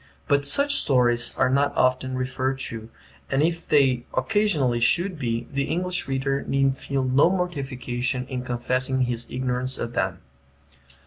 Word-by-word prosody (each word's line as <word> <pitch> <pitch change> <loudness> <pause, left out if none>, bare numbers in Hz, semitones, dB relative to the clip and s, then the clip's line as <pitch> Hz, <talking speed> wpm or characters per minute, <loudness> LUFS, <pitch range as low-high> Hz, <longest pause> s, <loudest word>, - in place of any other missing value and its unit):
But 140 0 +2
such 280 0 +4
stories 120 -3 +2
are - - +3
not 140 +2 +1
often 130 0 +1
referred 130 +1 -2
to, 115 -4 -5 0.4
and 135 +2 +1
if 165 +1 -1
they 135 -5 +3
occasionally 160 - +1
should 175 +8 +1
be, 115 -2 -2
the 140 0 -1
English 180 +3 -1
reader 135 +1 -1
need 135 -1 +1
feel 135 -1 -3
no 130 +5 +4
mortification 135 -8 -3
in 130 -1 -5
confessing 130 +1 0
his 120 -2 -1
ignorance 130 0 -2
of 120 0 -5
them. - - -1
130 Hz, 145 wpm, -24 LUFS, 125-140 Hz, 0.4 s, such